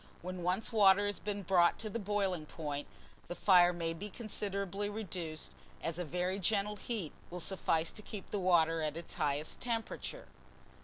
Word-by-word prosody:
When 185 0 -4
once 180 +5 0
water 200 -2 +6
has 205 0 -2
been 205 -1 -3
brought 175 -2 +4
to 220 - -4
the 215 +2 -3
boiling 195 -6 -1
point, 145 -3 -4 0.4
the 175 - -4
fire 180 -3 +6
may 165 -1 -2
be 200 +6 -6
considerably 200 -2 -3
reduced, 175 - -4 0.3
as 165 +1 -2
a - - 0
very 180 +4 -1
gentle 205 +2 +1
heat 205 -7 -3 0.2
will 180 - -5
suffice 165 -3 +1
to - - -8
keep 210 -1 -8
the 205 - 0
water 165 -3 +4
at 155 0 -1
its 170 - -2
highest 145 +1 -1
temperature. 235 - -3
185 Hz, 170 wpm, -34 LUFS, 165-205 Hz, 0.4 s, water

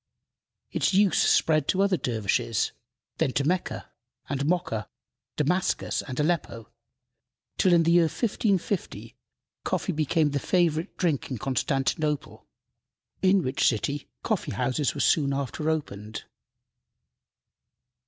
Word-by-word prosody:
Its - - +1
use 200 -2 +4
spread 155 -3 +3
to 190 - +1
other 200 -2 +3
dervishes, 110 - 0 0.5
then - - +2
to 140 - +1
Mecca 175 +5 -2 0.4
and 140 0 -2
Mocha, 160 - -1 0.5
Damascus 180 +5 0
and 130 -1 -6
Aleppo, 150 -8 -1 0.9
till, 185 - +4
in 170 -1 +5
the 165 - +3
year 170 -1 +5
1550, 200 - -1 0.5
coffee 190 - -1
became 155 -1 +1
the 140 - 0
favorite 165 0 0
drink 160 -7 0
in 130 - -3
Constantinople, 135 - -1 0.7
in 190 -1 +4
which 130 +1 +1
city 140 +5 -3
coffee 215 -5 -1
houses 130 +3 0
were - - -2
soon 140 -3 +3
after 140 +3 -2
opened. 110 -9 -4
150 Hz, 115 wpm, -26 LUFS, 135-175 Hz, 0.9 s, in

